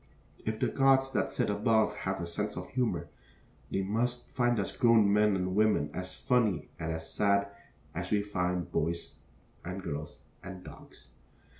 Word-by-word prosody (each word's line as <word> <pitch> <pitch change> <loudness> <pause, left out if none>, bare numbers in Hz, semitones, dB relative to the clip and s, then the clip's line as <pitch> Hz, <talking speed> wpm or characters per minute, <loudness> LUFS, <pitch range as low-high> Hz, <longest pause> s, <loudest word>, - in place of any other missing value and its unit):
If 110 0 -1
the - - +2
gods 135 -1 +3
that - - 0
sit - - 0
above 110 +2 +2
have 95 0 -3
a 85 - -3
sense 105 +5 -3
of 90 0 -6
humor, 125 -2 -1 0.6
they 95 - 0
must 120 +5 -1
find 120 -2 +2
us 100 - -2
grown 115 -4 +5
men 105 -1 +4
and 90 0 -1
women 105 -9 +3
as 90 +1 -5
funny 110 - +1
and 80 -1 -2
as 80 0 -5
sad 100 -1 +3 0.5
as 90 +2 -4
we 105 -1 +2
find 90 -3 -1
the - - -14
boys 85 +2 -2 0.5
and 90 +2 -5
girls 75 -1 -5 0.2
and 90 -1 -9
dogs. - - -13
100 Hz, 170 wpm, -31 LUFS, 90-110 Hz, 0.6 s, grown